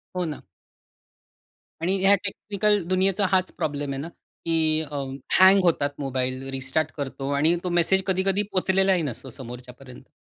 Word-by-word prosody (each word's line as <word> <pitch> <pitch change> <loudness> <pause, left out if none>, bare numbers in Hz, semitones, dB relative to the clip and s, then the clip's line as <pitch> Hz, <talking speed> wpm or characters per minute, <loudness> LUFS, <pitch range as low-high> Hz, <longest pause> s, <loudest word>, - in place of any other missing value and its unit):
हो 180 - -1
ना. 155 -3 -5 1.4
आणि 190 +3 +1
या 195 +1 +6
टेक्निकल 205 0 0
दुनियेचा 190 +2 +2
हाच 185 -1 +2
प्रॉब्लेम 145 -1 -2
आहे - - -5
ना, 155 - -6 0.4
की 160 -1 +1 0.6
हँग 190 +1 +7
होतात 155 -4 +2
मोबाईल, 130 -1 -2
रिस्टार्ट 135 +4 -1
करतो 140 0 -4
आणि 155 +4 +3
तो 180 - -2
मेसेज 190 +3 +2
कधी-कधी 195 +2 +1
पोहचलेलाही 190 0 +2
नसतो, 130 -1 -5
समोरच्या 125 0 -9
पर्यंत. 130 -1 -13
165 Hz, 140 wpm, -25 LUFS, 135-190 Hz, 1.4 s, हँग